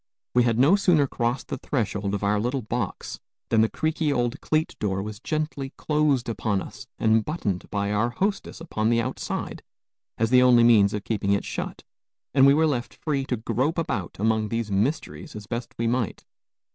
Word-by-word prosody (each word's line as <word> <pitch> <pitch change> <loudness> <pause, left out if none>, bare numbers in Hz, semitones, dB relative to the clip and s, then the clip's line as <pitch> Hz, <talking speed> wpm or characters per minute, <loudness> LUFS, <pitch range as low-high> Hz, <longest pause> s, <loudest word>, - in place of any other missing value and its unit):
We 125 - +5
had 115 -2 +1
no 140 +10 +6
sooner 175 -7 +3
crossed 120 -1 -2
the - - -4
threshold 105 -7 -2
of 100 - -4
our 105 +1 +2
little 125 +4 -1
box 110 -2 -4 0.3
than 110 -1 +4
the 110 - +3
creaky 155 -1 -1
old 120 -3 -1
cleat 155 0 0
door 95 -2 -1
was 105 0 -7
gently 150 -1 -3
closed 150 -5 +1
upon 110 -3 -1
us - - -9
and 110 0 +3
buttoned 105 - -3
by 100 -1 -1
our 110 +3 +1
hostess 195 - -2
upon 110 -10 -1
the 115 0 +3
outside, 115 - -4 0.6
as 115 +1 0
the 125 0 +7
only 125 -2 +6
means 105 -4 +5
of 105 - -4
keeping 100 -3 0
it 100 - 0
shut; - - -5 0.5
and 135 -1 +6
we 140 - +7
were 160 +1 +4
left 130 -6 -2
free 140 -4 -2
to 125 - -2
grope 130 +8 -1
about 115 - -2
among 110 +1 +1
these 115 -1 -2
mysteries 135 - -2
as 105 -1 -7
best 120 +2 -5
we 115 - -1
might. 115 -1 -1
120 Hz, 190 wpm, -25 LUFS, 105-140 Hz, 0.6 s, the